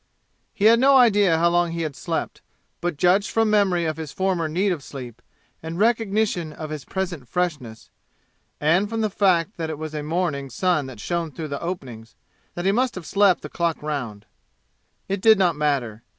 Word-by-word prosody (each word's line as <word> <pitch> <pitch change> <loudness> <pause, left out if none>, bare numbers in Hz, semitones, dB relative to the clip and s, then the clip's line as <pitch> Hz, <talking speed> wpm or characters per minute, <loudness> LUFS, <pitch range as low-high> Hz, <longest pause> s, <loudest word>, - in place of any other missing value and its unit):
He 205 - -2
had 230 +1 +7
no 270 +1 +6
idea 205 -8 +4
how 170 +1 +3
long 175 -1 +1
he 170 0 -2
had 150 -4 -4
slept, - - -4 0.4
but 175 -3 -2
judged 185 +5 +3
from 225 -1 +1
memory 190 -5 +2
of 155 0 -2
his 155 -3 -6
former 185 -4 -1
need 185 +6 0
of 170 -5 -3
sleep 120 -5 -9 0.4
and 160 +1 -6
recogntion 215 -6 +1
of 155 0 -7
his 150 -3 -6
present 175 -9 -4
freshness 145 -9 -3 0.7
and 175 +7 +2
from 225 0 -2
the 215 -2 0
fact 190 -1 +1
that 165 -2 -3
it 155 - -4
was 155 0 -6
a 150 - -3
morning 150 -3 -2
sun 155 +1 0
that 125 -5 -10
shone 170 +5 -2
through 155 +2 -6
the 140 - -4
openings 125 -11 -6 0.4
that 175 - -4
he 195 - +4
must 245 +3 0
have 185 -3 -7
slept 195 -1 +3
the - - -5
clock 170 -3 -2
round. 125 -9 -4 0.8
It 195 0 -2
did 220 +1 +6
not 180 -4 +2
matter. 135 -7 -1
170 Hz, 195 wpm, -23 LUFS, 150-195 Hz, 0.8 s, had